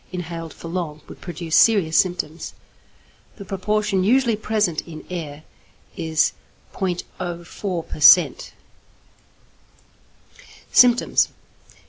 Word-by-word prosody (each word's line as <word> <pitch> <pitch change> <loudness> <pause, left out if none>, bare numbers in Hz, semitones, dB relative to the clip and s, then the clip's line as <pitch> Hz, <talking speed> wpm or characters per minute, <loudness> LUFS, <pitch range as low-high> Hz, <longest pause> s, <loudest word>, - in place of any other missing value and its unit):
inhaled 170 -2 -6
for - - -11
long 165 -3 -4
would - - -13
produce 170 -2 -4
serious 195 -8 +4
symptoms. 175 -3 -1 0.8
The 200 - -10
proportion 200 +1 -1
usually 235 +2 +3
present 210 -6 -1
in 155 -2 -10
air 155 -4 -6 0.5
is 160 -1 0 0.4
0.04 175 -1 -5
per - - -8
cent. 175 +4 +6 2.2
_Symptoms. 245 0 +5
180 Hz, 90 wpm, -22 LUFS, 165-205 Hz, 2.2 s, cent